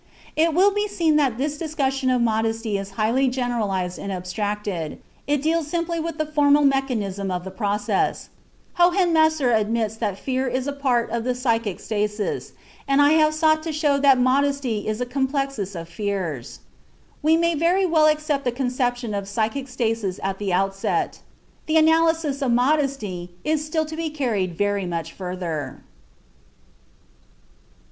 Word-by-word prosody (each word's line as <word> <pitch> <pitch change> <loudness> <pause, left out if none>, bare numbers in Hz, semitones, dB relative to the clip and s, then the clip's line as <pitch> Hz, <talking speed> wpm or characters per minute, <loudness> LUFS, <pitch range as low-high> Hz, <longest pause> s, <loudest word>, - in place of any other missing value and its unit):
It 320 0 +2
will 390 +3 +5
be 415 +1 0
seen 330 -6 +1
that 270 -6 +1
this 290 +2 -2
discussion 275 -5 -1
of 250 -2 +2
modesty 225 -1 0
is 195 0 -3
highly 235 +5 +2
generalized 220 -8 -1
and 200 - -5
abstracted; 190 -2 -3 0.3
it 290 -1 +1
deals 320 -1 +1
simply 335 +1 -2
with 330 -1 -4
the 310 - 0
formal 295 -1 +3
mechanism 230 -9 0
of 180 -1 -2
the 190 - -7
process. 205 0 -1 0.5
Hohenemser 325 -6 +4
admits 220 0 +1
that 210 -4 -2
fear 260 +3 -2
is 255 +1 -1
a 285 - -2
form 250 -5 0
of 240 +2 -1
psychic 230 -6 0
stasis, 210 -1 -2 0.3
and 275 0 +3
I 290 0 +6
have 310 -1 +4
sought 310 0 +3
to 320 0 -4
show 295 -2 +1
that 275 -2 +5
modesty 255 -3 +1
is 215 +2 -2
a - - 0
complexus 265 - -2
of 165 - -8
fears. 175 - -4 0.6
We 320 +1 +4
may 335 0 +2
very 345 +5 +2
well 320 -3 +4
accept 305 -2 +1
the 245 - 0
conception 245 -2 -1
of 200 -1 -3
psychic 225 +6 -2
stasis 225 -6 -2
at 195 0 -2
the 200 -2 -2
outset. 195 +2 0 0.5
The 315 +1 +3
analysis 320 -2 +3
of 265 -3 +1
modesty 245 - 0
has 310 -1 +1
still 315 +1 -1
to 310 +1 -7
be 325 0 -2
carried 220 - -2
very 205 -2 0
much 165 -2 -4
further. 175 -7 -5
250 Hz, 155 wpm, -23 LUFS, 205-305 Hz, 0.6 s, I